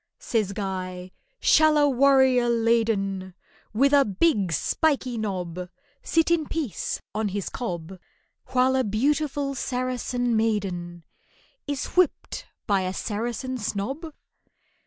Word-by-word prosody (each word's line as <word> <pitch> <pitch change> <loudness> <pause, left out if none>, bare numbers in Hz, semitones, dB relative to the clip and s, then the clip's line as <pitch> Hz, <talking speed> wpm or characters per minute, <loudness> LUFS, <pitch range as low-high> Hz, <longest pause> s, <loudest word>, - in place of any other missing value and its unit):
Says 215 -4 -1
GUY, 185 -2 -4 0.3
"Shall 310 -1 +5
a 290 -1 +5
warrior 265 -2 +4
laden 220 -5 +1 0.4
With 275 +6 +3
a 285 -1 +7
big 205 - +1
spiky 260 - 0
knob, 180 -5 -4 0.3
Sit 330 0 +1
in 320 -3 +2
peace 300 - -3
on 215 +1 -1
his 200 -1 -3
cob 180 -6 -5 0.5
While 255 +1 +2
a 260 - +2
beautiful 280 +5 0
Saracen 250 -2 -1
maiden 185 -6 -1 0.6
Is 285 -2 -2
whipped 365 -4 0 0.2
by 200 -3 +2
a 185 0 -3
Saracen 240 +4 -3
snob? 265 - -3
230 Hz, 115 wpm, -25 LUFS, 195-270 Hz, 0.6 s, a